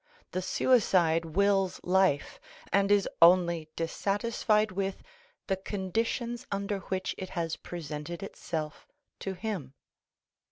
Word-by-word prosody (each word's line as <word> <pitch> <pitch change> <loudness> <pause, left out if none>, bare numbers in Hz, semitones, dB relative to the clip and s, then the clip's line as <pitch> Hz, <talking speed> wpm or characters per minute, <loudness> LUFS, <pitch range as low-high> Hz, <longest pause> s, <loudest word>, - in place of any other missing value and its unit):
The 185 - -1
suicide 180 -6 +3
wills 195 +3 +2
life, 185 -5 +2 0.3
and 200 0 +3
is 205 -2 +4
only 170 -2 +5
dissatisfied 210 +4 +1
with 195 +1 -3 0.4
the 190 - 0
conditions 225 +5 -2
under 200 0 -1
which 185 0 -3
it 185 -1 -5
has 165 -1 -1
presented 160 +1 -6
itself 155 -5 -5 0.3
to 190 -1 -4
him. 180 - -4
190 Hz, 110 wpm, -30 LUFS, 170-200 Hz, 0.4 s, only